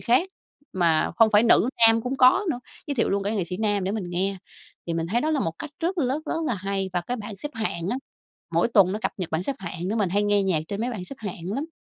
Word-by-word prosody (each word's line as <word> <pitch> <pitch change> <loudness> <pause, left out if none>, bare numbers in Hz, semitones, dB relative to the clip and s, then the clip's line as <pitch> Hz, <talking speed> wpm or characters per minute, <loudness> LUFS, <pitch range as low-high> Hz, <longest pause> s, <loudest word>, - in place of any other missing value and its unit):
khác, 255 +11 +2 0.4
mà 170 -4 +2
không 225 +1 +5
phải 210 +1 +6
nữ, 235 +1 +5 0.2
nam 225 0 +5
cũng 250 +3 -3
có 270 +11 +5
nữa, 245 - -3 0.3
giới 285 - -2
thiệu 235 - +1
luôn 200 0 0
cái 205 +3 0
nghệ 190 - 0
sĩ 180 +2 -5
nam 205 -2 0
để 195 - -1
mình 215 -3 -3
nghe. 190 +3 0 0.5
Thì 170 - -2
mình 165 0 -1
thấy 225 +8 0
đó 310 - 0
là 300 -3 +1
một 165 - -1
cách 305 - -6
rất 350 +3 -1
rất- 275 +1 0
rất 330 +1 -2
là 245 - 0
hay. 195 0 -2
Và 175 - 0
cái 245 +8 -3
bảng 210 -2 -7
xếp 295 +9 -6
hạng 185 -6 -2
á, 245 - 0 0.6
mỗi - - +3
tuần 195 -5 +4
nó 210 - -2
cập - - 0
nhật 180 -3 -4
bảng 160 +2 -1
xếp 275 +6 -3
hạng 180 0 -5
nữa, 215 - -1
mình 205 -4 +1
hay 205 +2 +2
nghe 205 -1 +2
nhạc 180 -5 +1
trên 200 0 -4
mấy 240 +2 -1
bảng 205 -7 -5
xếp 275 - -10
hạng 190 -4 -5
lắm. 295 +8 -3
205 Hz, 285 wpm, -25 LUFS, 185-250 Hz, 0.6 s, phải